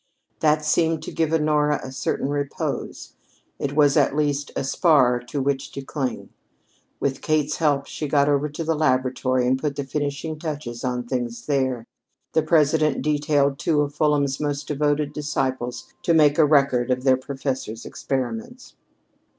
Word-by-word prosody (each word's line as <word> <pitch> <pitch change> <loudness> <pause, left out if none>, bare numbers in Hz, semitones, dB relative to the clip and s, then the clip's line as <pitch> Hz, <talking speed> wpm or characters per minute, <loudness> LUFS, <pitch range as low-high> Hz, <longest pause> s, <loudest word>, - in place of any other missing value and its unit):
That 155 0 +2
seemed 160 +1 +1
to - - -6
give 160 -2 0
Honora 150 -2 +2
a 130 - -7
certain 130 +1 -2
repose 145 -1 -4 0.5
it 140 0 -3
was 145 -2 +4
at 145 -2 +3
least 145 -1 0
a - - -1
spar 135 -4 +3
to 140 +4 -3
which 135 0 -1
to 140 - -6
cling. 135 -2 -4 0.7
With 135 -1 -1
Kate's 150 -2 0
help 145 -3 +1
she 150 - -5
got 140 0 +3
over 145 +1 +1
to 150 +3 -5
the 165 +1 +1
laboratory 130 -3 +1
and 130 +1 +2
put 145 0 -2
the 140 - -3
finishing 145 +2 -3
touches 145 -7 -5
on 125 -1 -1
things 120 -1 -4
there. 130 -5 0 0.5
The 160 - +4
President 155 -2 +2
detailed 145 -1 +1
two 150 -1 +2
of 145 -1 -2
Fulham's 145 -3 +1
most 145 -1 -2
devoted 145 0 0
disciples 130 -5 -3
to 170 - +2
make 150 -1 +4
a 155 - +7
record 140 -5 +3
of 125 0 0
their 130 -1 +5
professor's 130 -4 -4
experiments. 225 - -4
145 Hz, 160 wpm, -23 LUFS, 130-150 Hz, 0.7 s, a